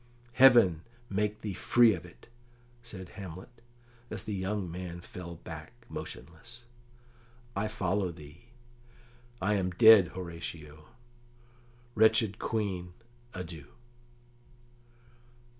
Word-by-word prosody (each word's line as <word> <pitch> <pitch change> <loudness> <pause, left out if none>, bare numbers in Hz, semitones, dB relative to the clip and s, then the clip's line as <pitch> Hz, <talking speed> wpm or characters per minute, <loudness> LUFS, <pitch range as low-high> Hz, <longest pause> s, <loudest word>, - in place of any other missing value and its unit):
"Heaven 120 -12 +6 0.3
make 105 +2 -1
thee 105 -2 -4
free 120 +4 +4
of 90 -2 -7
it!" 85 - -18 0.5
said 95 -6 -9
Hamlet, 100 +5 -10 0.5
as - - -4
the 110 - -4
young 95 -1 -2
man 90 0 -6
fell 85 0 -9
back - - -9 0.2
motionless. 115 +9 -9 0.9
"I 100 +2 0
follow 95 -3 -1
thee. 80 +3 -14 0.9
I 100 +3 +1
am 95 -3 0
dead, 105 0 +8
Horatio. 85 -4 -7 1.1
Wretched 110 -2 +3
Queen, 95 -5 -2 0.4
adieu!" 85 -5 -7
95 Hz, 95 wpm, -30 LUFS, 85-110 Hz, 1.1 s, dead